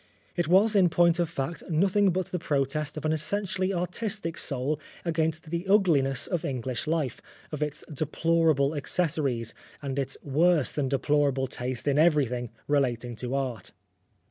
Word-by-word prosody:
It 175 -3 0
was, 200 +5 +4
in 185 -3 +5
point 170 +1 +3
of 170 -2 +1
fact, 165 +1 -4
nothing 195 +5 +3
but 185 0 0
the 180 - -2
protest 145 0 -1
of 155 - -5
an 155 - +2
essentially 185 +4 -1
artistic 180 0 -3
soul 140 +1 -1 0.3
against 160 -1 -1
the 170 +2 -3
ugliness 150 - +4
of 175 -4 -2
English 130 +1 -3
life, 155 -6 -1 0.3
of 150 -1 -5
its 150 0 -2
deplorable 155 -1 +1
accessories, 140 -7 -1 0.3
and 140 -1 -3
its 135 0 -2
worse 155 +1 +2
than 140 -3 -1
deplorable 140 0 +1
taste 125 +1 -5
in 145 +1 +3
everything 135 -7 +2 0.2
relating 125 -4 0
to 125 +3 -3
art. 125 -8 -3
150 Hz, 150 wpm, -27 LUFS, 135-170 Hz, 0.3 s, in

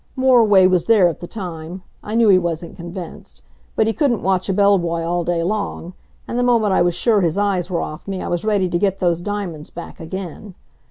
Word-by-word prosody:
Moriway 230 -7 +5
was 180 -2 +1
there 215 -6 +5
at 165 - -6
the 175 - -8
time. 175 -2 -7 0.2
I 215 - -5
knew 230 -1 +4
he 185 -2 +6
wasn't 170 -1 -4
convinced. 175 0 -9 0.3
But 220 - +2
he 225 - 0
couldn't 260 -7 0
watch 190 0 0
a - - +2
bell 200 0 +4
boy 170 -1 -2
all 175 +1 -1
day 170 -1 -1
long, 195 -2 -3 0.3
and 240 - -2
the - - +2
moment 230 -5 +2
I - - +3
was 175 -1 +2
sure 215 +1 +2
his 170 0 0
eyes 195 -3 0
were 175 -2 -1
off 155 +5 -7
me 195 -1 -3
I - - -5
was 175 0 -2
ready 205 -3 +1
to 175 -1 -1
get 195 -1 +1
those 175 -2 0
diamonds 185 -6 -5
back 170 - -10
again. 185 +3 -7
185 Hz, 225 wpm, -20 LUFS, 175-205 Hz, 0.3 s, he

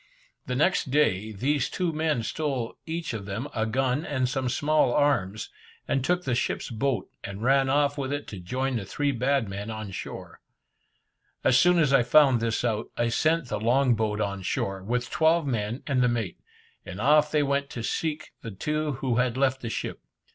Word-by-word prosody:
The 125 - -2
next 150 +1 +2
day, 110 -7 +2
these 130 +6 0
two 180 -3 -1
men 155 -6 0
stole 135 -3 -2
each 165 -4 -3
of 105 -3 -5
them 105 +8 -4
a 110 -1 0
gun 130 +5 0
and 130 -6 -1
some 130 0 -1
small 145 0 +2
arms, 110 -9 +1 0.4
and 135 -2 0
took 180 +5 +1
the 130 - -1
ship's 120 - -1
boat, 120 -3 -1 0.2
and 100 +2 -6
ran 135 +1 +3
off 145 +1 +2
with 135 -1 -2
it 145 0 -3
to 100 - -7
join 130 +8 -2
the 110 - -3
three 145 +8 -1
bad 135 -1 +1
men 100 +2 -5
on 110 -2 -5
shore. - - -8 1.0
As 130 - +4
soon 180 0 +5
as 150 -5 +3
I 135 - +6
found 135 0 +5
this 115 +1 -1
out, 110 -2 -1
I 120 0 +1
sent 155 +2 +1
the 105 - -2
long 125 +3 +3
boat 105 -1 -1
on 100 -2 -2
shore, 95 +1 -2
with 120 +4 -2
twelve 160 0 +3
men 115 -1 -2
and 130 -3 +1
the 125 - +4
mate, 115 -7 -3 0.4
and 90 - -8
off 150 +5 +4
they 150 -1 +3
went 140 0 0
to 115 - -6
seek 155 +4 -2
the 115 - -6
two 150 +9 -2
who 130 -2 -1
had 125 0 +1
left 135 -1 +1
the 115 - -4
ship. - - -4
130 Hz, 200 wpm, -26 LUFS, 110-145 Hz, 1.0 s, I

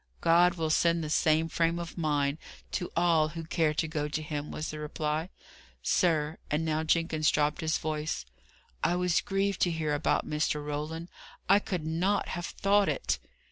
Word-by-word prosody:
"God 170 +1 +5
will 160 -2 -1
send 170 +1 +3
the 150 - -4
same 160 +1 +3
frame 165 +1 +1
of 170 -1 -6
mind 145 -2 0 0.3
to 175 - -3
all 165 -2 +3
who 165 +1 -6
care 160 -1 +1
to 160 - 0
go 150 -2 -2
to 155 +1 -3
Him," 150 -1 -4
was 155 - -4
the 155 - -6
reply. 150 +2 -2 0.5
"Sir," 160 -4 +1
and 155 +2 0
now 155 0 0
Jenkins 160 -1 +2
dropped 150 0 +1
his 160 0 +1
voice, 155 - -3 0.6
"I 175 - +3
was 180 -1 +2
grieved 195 0 -1
to 175 - +3
hear 155 -2 -1
about 145 +2 +1
Mr. 150 -1 -1
Roland. 155 +3 -4 0.4
I 200 +1 +6
could 180 -6 -4
not 180 +6 0
have 175 -1 -3
thought 200 0 +2
it." - - -1
160 Hz, 180 wpm, -29 LUFS, 150-170 Hz, 0.6 s, I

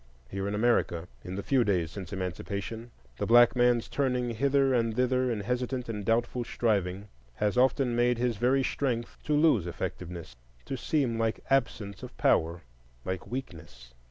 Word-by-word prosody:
Here 100 0 -3
in 100 - -2
America, 105 -7 +1 0.2
in 90 0 -6
the 100 - -4
few 135 -3 +3
days 90 -7 0
since 95 -3 -8
Emancipation, 100 +4 -4 0.3
the - - -1
black 120 +2 +6
man's 120 -1 +3
turning 125 -3 0
hither 135 +3 +2
and 115 -2 +1
thither 125 +1 +2
in 110 -4 -1
hesitant 125 +3 -2
and 105 -2 -4
doubtful 120 +3 0
striving 100 -4 -1 0.3
has 105 - 0
often 130 -1 +2
made 120 0 +2
his 120 -2 0
very 130 +4 +2
strength 125 -4 -2
to 150 - 0
lose 145 - +4
effectiveness, 85 0 -6 0.3
to 135 - -3
seem 130 -4 0
like 115 -1 -1
absence 115 -6 0
of - - -10
power, 85 +2 +2 0.4
like 95 -2 -4
weakness. 80 - -8
115 Hz, 160 wpm, -29 LUFS, 100-125 Hz, 0.4 s, black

